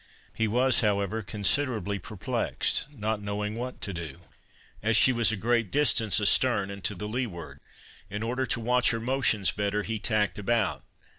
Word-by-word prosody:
He 110 - 0
was, 125 +4 +3
however, 105 0 0
considerably 105 0 0
perplexed, 135 - -2
not 110 -5 -3
knowing 105 +1 -3
what 125 +3 -6
to 100 - -3
do, 85 -1 -7 0.6
as 110 +1 +3
she 130 - +6
was 115 -3 +3
a 110 - -2
great 115 0 +1
distance 115 -6 +2
astern 105 -1 +3
and 100 -1 -9
to 105 - 0
the 105 +3 -5
leeward. 105 -8 -5 0.5
In 105 +2 -4
order 125 +3 -2
to 120 - 0
watch 125 +2 +2
her 115 - 0
motions 115 -4 +1
better, 105 0 -1
he 110 0 -2
tacked 105 -1 0
about. 115 +1 0
110 Hz, 165 wpm, -27 LUFS, 100-120 Hz, 0.6 s, she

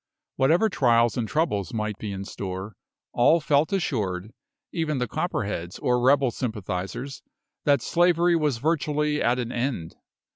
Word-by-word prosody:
Whatever 160 +11 +3
trials 120 - +3
and 115 -3 -1
troubles 125 - -1
might 105 -1 -2
be 105 - -4
in 95 0 -5
store, 95 +1 -6 0.4
all 155 +8 +5
felt 150 -1 +2
assured, 110 - -2 0.4
even 160 -4 -1
the 125 -1 -1
Copperheads 85 -4 -3
or 125 0 +1
rebel 135 0 +4
sympathisers, 110 +3 -4 0.4
that 140 -4 +3
slavery 175 0 +3
was 150 -6 +1
virtually 150 +1 0
at 120 +2 +2
an 120 -2 -3
end. 120 -10 -3
125 Hz, 140 wpm, -25 LUFS, 105-150 Hz, 0.4 s, all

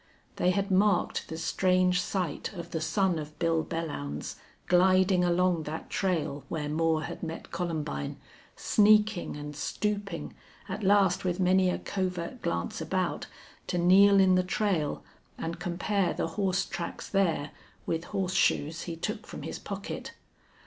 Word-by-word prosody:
They 180 - +2
had 195 +2 0
marked 190 -1 +2
the 160 - -5
strange 180 +1 +2
sight 180 -5 -2
of 170 -2 -8
the 160 - -2
son 175 +1 +1
of 150 0 -8
Bill 165 -2 +1
Belllounds, 145 - -4 0.3
gliding 185 0 +4
along 175 -1 +2
that 160 - -6
trail 165 -7 -1
where 150 -2 -2
Moore 160 +1 +1
had - - -6
met 165 -1 -6
Columbine, 155 - -3 0.4
sneaking 210 -4 +3
and 150 0 -7
stooping, 205 +6 -3 0.3
at 200 +2 -4
last 195 -2 +3
with 180 0 -1
many 185 0 +4
a - - 0
covert 180 -3 -3
glance 85 0 -2
about, - - -1 0.4
to 180 - -1
kneel 195 +3 +6
in 190 -1 +5
the 185 - +4
trail 180 -5 -1 0.3
and 165 +1 -4
compare 180 +2 0
the - - -1
horse 190 +1 0
tracks 175 -2 -5
there 170 -7 +1 0.3
with 165 +1 -2
horseshoes 180 -5 +1
he 165 - -3
took 165 - -4
from - - -8
his - - -5
pocket. - - -6
180 Hz, 145 wpm, -29 LUFS, 165-190 Hz, 0.4 s, kneel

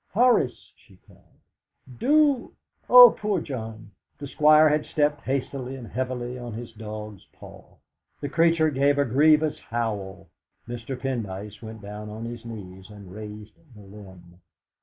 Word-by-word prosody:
"Horace!" 225 - +2
she - - -22
cried, - - -24 0.6
"do 290 -2 +2 0.3
Oh, 245 -1 +10
poor 210 -3 0
John!" 110 -7 -7 0.3
The 145 - -8
Squire 155 +2 +5
had 150 0 +1
stepped 145 -1 0
hastily 135 -1 -4
and 125 -3 -9
heavily 125 +1 -4
on 120 -2 -7
to - - -6
his 115 -1 -9
dog's 105 -3 -8
paw. - - -15 0.4
The 145 - -4
creature 165 +1 +2
gave 140 +1 +2
a 145 - +2
grievous 150 +4 +3
howl. 100 -5 -4 0.4
Mr. 120 +2 -6
Pendyce 105 -6 -5
went 110 -2 -10
down 105 +1 -8
on 110 +2 -7
his 120 -1 -7
knees 95 -4 -10
and 100 -3 -12
raised 105 0 -9 0.2
the 105 - -14
limb. 95 -3 -15
120 Hz, 145 wpm, -25 LUFS, 105-150 Hz, 0.6 s, Oh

